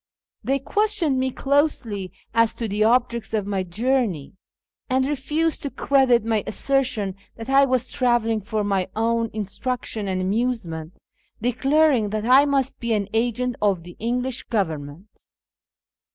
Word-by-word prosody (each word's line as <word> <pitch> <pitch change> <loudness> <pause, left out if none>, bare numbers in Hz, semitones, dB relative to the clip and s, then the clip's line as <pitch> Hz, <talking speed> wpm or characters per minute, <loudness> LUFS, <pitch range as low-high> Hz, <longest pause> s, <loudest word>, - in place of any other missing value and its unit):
They 270 +1 +1
questioned 345 -2 0
me 260 0 +1
closely 260 - 0 0.2
as 230 0 +3
to 230 - -3
the 210 +1 0
objects 235 -1 +1
of 210 -2 -1
my 200 -2 -1
journey, 205 - -1 0.6
and 260 0 +2
refused 295 +3 -1
to 280 - -3
credit 265 -5 +3
my 220 -3 +1
assertion 230 -5 0 0.2
that 225 +2 -8
I 275 +1 +6
was 255 -2 0
travelling 235 -3 +1
for 215 +1 -2
my 195 -2 0
own 230 +1 +1
instruction 215 +1 -4
and 185 -1 -1
amusement, 185 -5 -2 0.4
declarincj 270 -1 +3
that 215 +1 -3
I 260 +4 +6
must 275 -2 0
be 235 -1 -1
an 205 -2 -1
agent 245 +2 0
of 195 -5 +1
the 175 0 -11
EnQ 245 +2 0
lish 260 -1 -4
Government. 160 -3 -4
230 Hz, 145 wpm, -23 LUFS, 205-260 Hz, 0.6 s, I